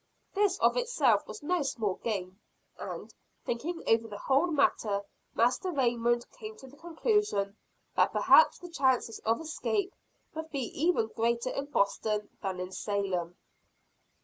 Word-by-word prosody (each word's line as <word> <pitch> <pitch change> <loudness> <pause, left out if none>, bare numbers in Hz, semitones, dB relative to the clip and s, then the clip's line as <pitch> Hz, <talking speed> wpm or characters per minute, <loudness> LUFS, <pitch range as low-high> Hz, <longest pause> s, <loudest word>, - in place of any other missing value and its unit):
This 405 -2 +2
of - - +3
itself 290 - +2
was 215 - -9
no 350 +2 +1
small 225 -8 -1
gain; 190 -4 -3 0.4
and, - - -7 0.3
thinking 320 +9 -3
over 225 0 +3
the 205 -2 -7
whole 275 +9 +2
matter, 220 - +1 0.3
Master 245 +10 +2
Raymond 240 -4 +1
came 440 0 -9
to - - -12
the 265 +2 -14
conclusion 330 - 0 0.4
that - - +4
perhaps 480 - +6
the 355 - -10
chances 260 -6 +1
of 225 +1 0
escape 375 +5 -2 0.4
would 320 0 -6
be 275 -4 -2 0.2
even 335 -11 +2
greater 235 +2 0
in 275 - -3
Boston 210 -4 0
than 190 -2 -3
in 180 0 -5
Salem. 185 -4 -2
245 Hz, 145 wpm, -30 LUFS, 210-330 Hz, 0.4 s, perhaps